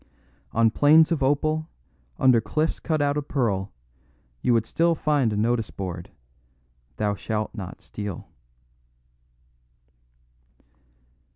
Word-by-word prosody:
On 115 0 +3
plains 155 +6 +5
of 160 -4 0
opal, 155 +3 +1 0.5
under 125 -3 +4
cliffs 155 +10 -1
cut 155 -3 0
out 145 0 +1
of 145 -1 -3
pearl, 100 -8 -1 0.7
you - - +2
would 115 -1 +3
still 170 +5 +1
find 145 -7 +1
a 105 - -2
notice 115 +1 0
board, 90 -3 -6 0.9
'Thou 105 -1 0
shalt 110 +1 -3
not 95 -4 -8
steal. 100 -4 -6
120 Hz, 110 wpm, -25 LUFS, 105-150 Hz, 0.9 s, plains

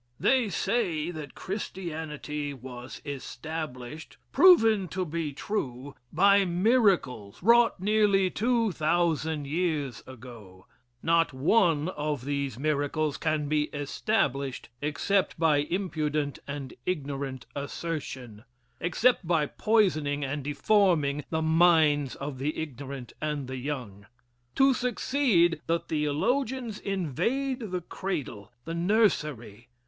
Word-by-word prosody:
They 250 -4 +3
say 185 -7 -1
that 155 -4 -8
Christianity 155 -7 -5
was 125 0 -9
established, 145 0 -6
proven 225 - +6
to 185 +1 -3
be 160 -2 -3
true, 140 - -4 0.2
by 200 +4 +5
miracles 180 - +1
wrought 235 0 +5
nearly 200 -2 +3
two 230 -1 +1
thousand 160 -2 0
years 150 -5 -1
ago. 115 -7 -12 0.4
Not 165 -2 +3
one 160 +2 +2
of 150 -6 -3
these 140 -4 -2
miracles 150 +1 0
can 155 -2 -1
be 150 0 +1
established 140 - -2
except 160 +6 0
by 160 -3 +4
impudent 150 -3 -1
and 140 -2 -6
ignorant 140 -6 -3
assertion 140 -7 -5 0.4
except 195 +2 +2
by 165 -3 +2
poisoning 155 -8 +1
and 145 +1 -3
deforming 150 -2 +2
the 160 -1 -1
minds 160 -4 +4
of 140 -2 -6
the 145 +3 -2
ignorant 140 -4 -6
and 150 -3 -2
the 130 0 -5
young. 125 -8 -5 0.5
To 270 0 +5
succeed, 245 - +2
the 165 +1 +2
theologians 220 - -1
invade 225 - -2
the 180 0 -2
cradle, 160 - -5
the 165 - -4
nursery. 150 - 0
155 Hz, 110 wpm, -28 LUFS, 140-190 Hz, 0.5 s, proven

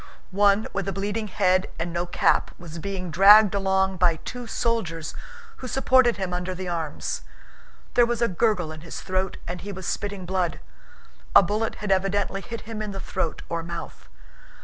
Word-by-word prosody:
One 200 +2 +3
with 195 0 -2
a - - 0
bleeding 205 +3 -2
head 185 -1 +2
and 170 +1 -3
no 175 +1 -1
cap - - +2
was 170 -1 -9
being 185 -1 -4
dragged 205 +4 +8
along 190 -1 +1
by 175 -2 +3
two 245 +9 -7
soldiers 190 -10 -2 0.4
who 255 - -7
supported 260 -2 +3
him 190 -2 -3
under 180 +1 -3
the 185 0 -5
arms. 165 - -3 0.7
There 240 -1 +5
was 240 -1 -1
a 235 - +3
gurgle 185 -4 +1
in 155 -1 -9
his 165 - -7
throat 185 0 -2
and 180 +1 -5
he 205 - -6
was 190 -1 -7
spitting 200 -1 -3
blood. 180 -2 -1 0.8
A - - +10
bullet 215 +4 -1
had 205 -2 -3
evidently 195 +1 +1
hit 230 +3 -7
him 220 -1 -6
in 210 -2 -4
the 195 - -5
throat 175 -4 -3
or 170 0 -2
mouth. 170 +1 -8
190 Hz, 180 wpm, -25 LUFS, 175-210 Hz, 0.8 s, A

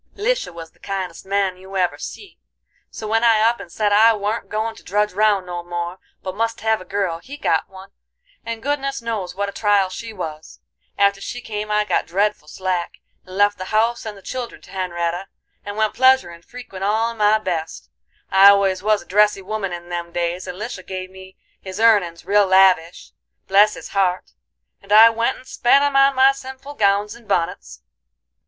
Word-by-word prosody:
"Lisha - - -1
was 165 -1 -10
the - - -31
kindest 190 -3 -5
man 195 -2 0
you 190 +1 -8
ever 180 -1 0
see, 400 - -9 0.5
so 215 - -7
when 225 +2 +1
I 225 -2 +5
up 230 +2 +2
and 170 - -10
said 205 +1 0
I 220 +2 +6
warn't 210 +2 -3
goin' 220 +1 -2
to - - -13
drudge 210 +1 0
round 205 -1 +2
no 175 -1 -5
more, 175 +1 -5 0.2
but 185 - -4
must 230 +1 -2
hev 220 -1 +1
a - - -11
girl, 195 -5 -2
he 275 +11 -10
got - - 0
one, 190 +1 -13 0.5
and 230 -1 -6
goodness 275 -3 -2
knows 200 -6 -4
what 200 +1 -2
a - - -5
trial 205 -2 +2
she 225 +5 -7
was. 160 -6 -8 0.4
After 200 0 +2
she 245 - -5
came 210 -2 -5
I 210 0 +1
got - - 0
dreadful 195 -2 -1
slack, 185 +1 -3 0.3
and 185 +1 -9
left 205 0 +3
the 185 - -5
house 225 +4 0
and 215 -2 -7
the 195 - -16
children 250 +1 -6
to - - -16
Hen'retta, 175 -1 -3 0.4
and 205 +1 -7
went 215 -1 +1
pleasurin' 260 -10 +3
frequent 220 -2 -10
all 220 +3 +1
in 230 - -11
my 210 0 +4
best. 160 - -5 0.4
I 195 +1 +8
always 195 -2 +3
was 210 +1 +1
a - - -25
dressy 205 0 +2
woman 200 -1 -3
in 175 0 -7
them 170 -1 -5
days, 175 +1 -3
and 180 - -6
Lisha 215 -2 -6
give 185 0 -7
me 190 0 -14 0.2
his 190 +1 -8
earnin's 200 -7 +3
real 205 0 +3
lavish, 185 -3 +3 0.4
bless 205 +2 +4
his - - -9
heart! 185 -2 0 0.5
and 200 - -14
I 220 +2 +8
went 230 +1 -1
and - - -16
spent 275 +4 +3
'em 285 -1 0
on 275 0 +5
my 265 +1 +6
sinful 265 +1 -9
gowns 205 -2 +1
and 235 -2 -16
bunnets." 65 - -2
200 Hz, 200 wpm, -20 LUFS, 185-225 Hz, 0.5 s, I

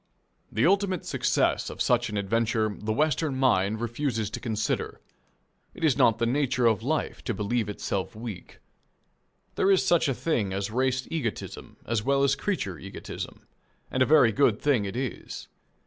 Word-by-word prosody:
The 110 +4 +2
ultimate 190 -1 +2
success - - +1
of - - -9
such 120 -1 +2
an 105 - -3
adventure 110 +1 0
the 110 +1 -4
Western 150 +3 +1
mind 110 -5 +2
refuses 120 -2 -2
to - - -4
consider. 110 -2 -2 0.8
It - - -8
is 150 -6 +4
not 115 -1 +4
the 115 - +1
nature 130 0 +1
of 110 -2 +3
life 150 +6 -2
to - - -1
believe 105 +2 -1
itself 100 +1 -3
weak. 110 -6 -8 1.0
There 195 - +2
is 195 -2 +4
such 170 -3 +3
a 135 - 0
thing 110 -13 -1
as 100 +1 -2
race 130 +2 0
egotism 140 -10 -4
as 115 -2 0
well 140 +4 +2
as 135 -1 +3
creature 135 - -2
egotism, 100 +1 -8 0.5
and 130 - -1
a 130 - +5
very 145 -6 +6
good 115 -3 +3
thing 130 -8 +2
it 100 - -5
is. 130 -1 -5
120 Hz, 165 wpm, -27 LUFS, 105-140 Hz, 1.0 s, very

